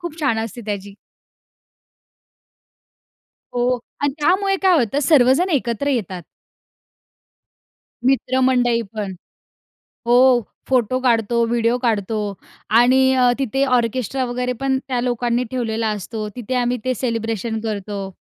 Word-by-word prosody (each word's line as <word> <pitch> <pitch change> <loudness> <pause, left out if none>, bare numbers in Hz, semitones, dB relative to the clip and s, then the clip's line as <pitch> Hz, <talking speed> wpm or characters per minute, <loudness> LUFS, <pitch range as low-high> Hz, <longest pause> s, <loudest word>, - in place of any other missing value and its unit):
खूप 340 -2 -7
छान 260 -7 +1
असते 230 +2 -8
त्याची. 200 -1 -5 2.6
हो. 245 +1 +1 0.2
आणि 285 -1 +1
त्यामुळे 390 +5 +2
काय 370 -2 +5
होतं 250 +2 0
सर्वजण 280 +3 +4
एकत्र 255 -3 -1
येतात. 195 -9 -2 1.8
मित्रमंडळीपण 245 -6 +1 0.9
हो. 240 +1 +4 0.5
फोटो 255 -1 +2
काढतो, 235 -2 +2
व्हिडिओ 235 +1 +1
काढतो 220 -4 -1 0.6
आणि 250 +2 +5
अ, 250 -1 +4
तिथे 270 +1 0
ऑर्केस्ट्रा 255 +2 -1
वगैरे 250 +1 -2
पण 270 -1 +1
त्या 250 -2 -1
लोकांनी 240 0 0
ठेवलेला 230 -3 -1
असतो, 215 +1 -4
तिथे 250 +1 -4
आम्ही 245 0 0
ते 255 - +1
सेलिब्रेशन 225 -2 -2
करतो. 205 -2 -4
245 Hz, 110 wpm, -20 LUFS, 225-260 Hz, 2.6 s, काय